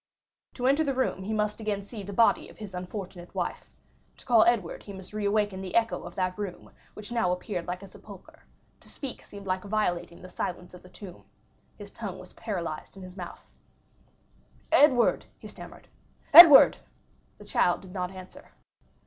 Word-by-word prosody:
To 250 - -4
enter 280 +4 +3
the 275 -3 -2
room 260 -7 -1
he 195 +3 -5
must 210 0 -1
again 205 -2 -2
see 210 +1 -9
the 200 +1 -8
body 225 +3 +2
of - - -16
his 210 -3 -9
unfortunate 180 -1 -8
wife. - - -4 0.5
To - - -19
call 230 -3 +5
Edward 230 -8 0
he 200 - -10
must 190 +1 -11
reawaken 205 -2 -1
the 185 -2 -6
echo 230 -1 +1
of - - -10
that 185 +1 -2
room 195 -4 -7 0.2
which 210 +2 -10
now 230 -7 +1
appeared 180 0 -4
like 180 +2 -5
a - - -10
sepulchre; 195 0 -15 0.4
to - - -17
speak 275 -3 -8
seemed 200 -1 -12
like 185 -1 -2
violating 180 -5 -2
the - - -9
silence 180 0 -5
of 180 - -12
the 180 - -16
tomb. 185 -1 -12 0.5
His - - -11
tongue - - -7
was - - -13
paralyzed 175 -5 -6
in 190 - -10
his 185 0 -11
mouth. 180 -3 -10 1.2
"Edward!" 260 -5 +4
he - - -11
stammered—"Edward!" 330 -5 +6 0.6
The - - -14
child 175 - +1
did 185 -1 -13
not 180 -2 -3
answer. 185 -1 -13
195 Hz, 175 wpm, -27 LUFS, 180-220 Hz, 1.2 s, stammered—"Edward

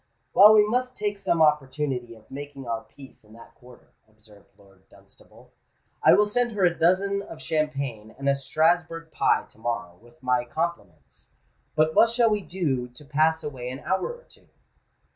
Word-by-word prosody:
"Well, 210 +2 +8
we 210 -1 +5
must 250 +3 -1
take 205 -1 -3
some 170 -4 +2
opportunity 135 -5 0
of 110 - -21
making 140 -1 -8
our 115 -1 -2
peace 135 +1 -16
in 105 0 -19
that 115 +1 -15
quarter," 125 0 -18 0.2
observed 105 -1 -20
Lord 95 -1 -24
Dunstable. - - -20 0.5
"I - - +6
will 210 - +4
send 240 +3 -1
her 200 -3 +2
a 175 - +3
dozen 190 +4 +1
of 165 -5 -11
champagne 140 -9 -3
and 140 - -5
a 140 - +4
Strasburg 165 +3 0
pie - - +1
to - - -22
morrow, 110 -7 -4
with 120 +6 -22
my 125 -1 +1
compliments. 125 - -6 0.5
But 155 0 +2
what 230 - +5
shall 235 -1 +2
we 210 -1 0
do 150 -10 -2
to 125 +4 -16
pass 155 +3 +1
away 130 -4 -6
an 130 +3 -7
hour 190 - -1
or 485 0 -13
two?" - - -21
150 Hz, 180 wpm, -25 LUFS, 125-185 Hz, 0.5 s, Well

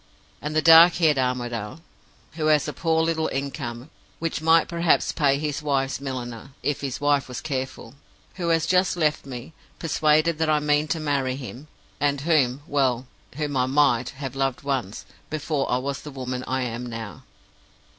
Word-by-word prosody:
And 150 +1 -4
the 155 - +2
dark 165 +1 +9
haired 155 -5 +3
Armadale, 120 -2 -2 0.5
who 155 -1 -2
has 150 -2 +3
a - - -3
poor 160 -1 +1
little 160 -1 0
income, 135 -1 -5 0.3
which 165 -2 -3
might 165 0 +4
perhaps 170 -1 +2
pay 140 -2 +2
his 150 0 -3
wife's 135 -2 -1
milliner, 130 -1 -6
if 145 - -1
his 135 -3 -4
wife 145 -1 +2
was 125 -1 -6
careful; 130 -4 -5 0.4
who 175 -2 -1
has 165 -1 +2
just 180 +1 +2
left 155 -4 0
me, 130 +4 -8 0.2
persuaded 155 0 +2
that 160 -1 +1
I 155 -1 +3
mean 150 +1 +1
to 170 -2 -1
marry 140 -4 0
him; 135 +2 -9 0.3
and 145 -1 +1
whom 145 -4 +2
well, 130 -4 +1 0.3
whom 145 -1 -3
I 130 -1 +2
might 135 -3 +3
have 135 -2 -5
loved 135 -1 -1
once, 130 -8 -3 0.2
before 150 -2 -2
I 125 - +3
was 140 +2 -3
the 150 - -8
woman 130 -2 -5
I 130 0 -1
am 120 0 -4
now. 115 -2 -7
140 Hz, 175 wpm, -24 LUFS, 130-155 Hz, 0.5 s, dark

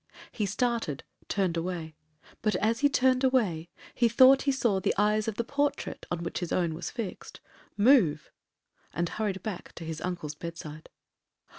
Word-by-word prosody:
He 210 -3 -2
started, 210 - -1 0.2
turned 185 -4 0
away; 165 -2 -4 0.5
but, 215 -1 +1
as 225 +2 +1
he 285 0 +4
turned 260 -1 +3
away, 200 -11 +1 0.2
he 235 -1 +3
thought 260 +4 +7
he 280 - +1
saw 235 -7 +1
the 195 - 0
eyes 210 +1 +2
of 220 - -2
the 235 - -1
portrait, 285 +4 -2
on 175 -1 -3
which 170 - -3
his 175 -3 -4
own 170 -3 +1
was 165 +3 -5
fixed, 230 -6 -6 0.4
move, 205 - +4 0.6
and 175 +1 0
hurried 200 -4 -3
back 210 -5 -6
to 165 - -8
his 160 0 -5
uncle's 175 -5 -4
bedside. 155 -1 -8
200 Hz, 165 wpm, -28 LUFS, 170-235 Hz, 0.6 s, thought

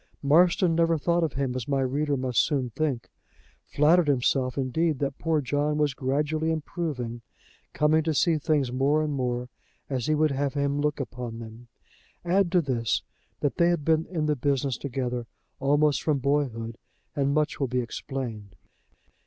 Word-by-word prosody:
Marston 170 +4 +4
never 165 0 +3
thought 170 +3 +1
of 155 -5 -1
him 135 -2 -1
as 125 -3 -4
my 140 -1 +1
reader 140 +2 0
must 125 -3 +2
soon 135 -5 -1
think 140 -2 -2 0.6
flattered 160 +3 +4
himself, 130 -1 +1
indeed, 150 +4 0
that 140 0 -3
poor 160 -2 +1
John 145 +3 0
was 150 -2 +1
gradually 150 +5 -1
improving, 150 -7 -3 0.5
coming 155 +1 +3
to 160 - +1
see 165 +1 +3
things 145 -4 +1
more 140 +4 +2
and 150 -1 -2
more 125 -2 -2 0.4
as 130 -3 -1
he 155 - +3
would 155 0 +2
have 140 +1 -1
him 140 0 0
look 150 0 0 0.2
on 120 -2 -5
them. 115 +1 -10 0.6
Add 180 0 +2
to 180 - +5
this, 120 -5 0 0.4
that 145 - -1
they 170 0 +4
had 170 -4 0
been 160 0 +2
in 165 -4 -2
the 150 -1 +1
business 140 -1 0
together 125 -2 -3 0.3
almost 145 +1 +2
from 155 -3 +1
boyhood, 125 -5 -1 0.4
and 140 -1 +1
much 150 0 0
will 135 - +1
be 125 +1 -2
explained. 115 -5 -6
140 Hz, 170 wpm, -26 LUFS, 130-155 Hz, 0.6 s, to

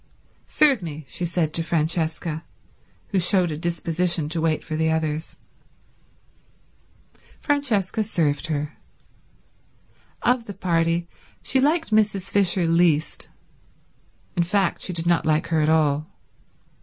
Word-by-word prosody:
"Serve 280 -8 +3
me," 155 -3 -7
she 175 - -4
said 165 -3 -1
to 165 - +2
Francesca, 160 0 -1 0.7
who 195 - +1
showed 180 -1 +3
a - - -3
disposition 170 0 0
to 160 +1 -1
wait 160 -1 0
for 155 - -5
the 160 +1 +1
others. 160 0 -2 2.0
Francesca 225 - 0
served 165 -7 -1
her. 150 -1 -3 1.5
Of 245 -1 +2
the 200 - -8
party 170 -2 0 0.4
she 265 - +1
liked 315 0 +1
Mrs. 205 -3 +1
Fisher 190 -3 +3
least, 165 -2 +2 1.1
in 175 - +2
fact 185 +1 0
she - - -2
did 165 -1 -2
not 170 -1 +2
like 155 0 +1
her 160 -2 +2
at 150 - +2
all. 155 -1 +2
170 Hz, 125 wpm, -23 LUFS, 160-190 Hz, 2.0 s, Serve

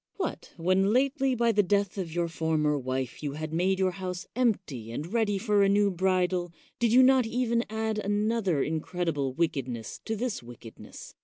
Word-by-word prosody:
What? 370 -4 -4
when 185 +4 +2
lately 270 +1 +2
by 235 -1 +3
the 210 -1 +4
death 200 0 0
of 175 -4 -4
your 170 +1 0
former 160 -2 0
wife 130 -2 -3
you 145 -2 -3
had 155 +1 -5
made 185 +3 +1
your 190 -1 +2
house 180 0 -5
empty 190 - -1
and 155 - -5
ready 220 -4 +1
for 205 0 +2
a 195 - +4
new 200 0 +3
bridal, 180 -1 0 0.3
did 235 -2 +2
you 255 +2 +7
not 260 -2 +5
even 235 0 0
add 220 0 -2
another 205 -5 0
incredible 160 -3 -2
wickedness 130 -8 -3
to 220 - -2
this 235 +1 -3
wickedness? 120 -1 -12
190 Hz, 175 wpm, -28 LUFS, 160-220 Hz, 0.3 s, you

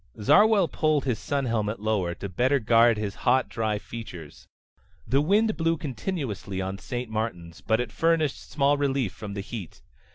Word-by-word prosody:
Zarwell 205 - +5
pulled 155 -3 +1
his 125 -5 -1
sun 140 -3 -1
helmet 110 -3 -1
lower, 100 -5 -1
to 100 - -6
better 125 +9 +2
guard 115 -1 +4
his 105 -2 -3
hot, 130 +1 +3
dry 110 -2 -1
features. 95 -9 -9 0.6
The 135 +2 +2
wind 210 +7 +2
blew 165 0 +1
continuously 130 - -4
on 95 +1 -4
St. 125 0 -4
Martin's, 105 -7 -4
but 110 0 +1
it 120 -3 -3
furnished 165 -3 0
small 145 0 +2
relief 135 -8 0
from 105 -2 -7
the 100 - -3
heat. 100 -5 -8
120 Hz, 165 wpm, -26 LUFS, 105-145 Hz, 0.6 s, Zarwell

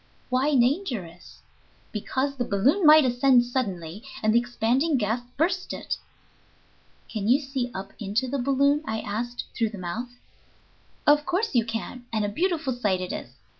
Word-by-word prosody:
"Why 265 +4 +2
dangerous?" 240 - -1 0.5
"Because 260 +6 -2
the 245 - 0
balloon 265 - +2
might 305 -1 +8
ascend 245 0 +4
suddenly, 200 -8 -3 0.2
and 215 0 +3
the 235 - +6
expanding 245 +5 +1
gas 225 +1 0 0.2
burst 360 +4 0
it." - - -3 1.1
"Can 210 -2 -3
you 255 +5 +5
see 265 -3 -3
up 190 +1 -6
into 215 +4 -1
the 275 +2 -2
balloon," 280 +3 +2
I 220 -5 -3
asked, 235 +3 -4
"through 225 -2 +1
the 210 - -9
mouth?" 190 +7 -4 1.0
"Of 295 0 +5
course 375 +5 0
you 235 -3 +3
can, 230 +2 -5
and 215 -2 0
a - - -1
beautiful 325 - 0
sight 205 -6 0
it 185 0 -4
is. 125 +2 -7
245 Hz, 160 wpm, -26 LUFS, 215-280 Hz, 1.1 s, might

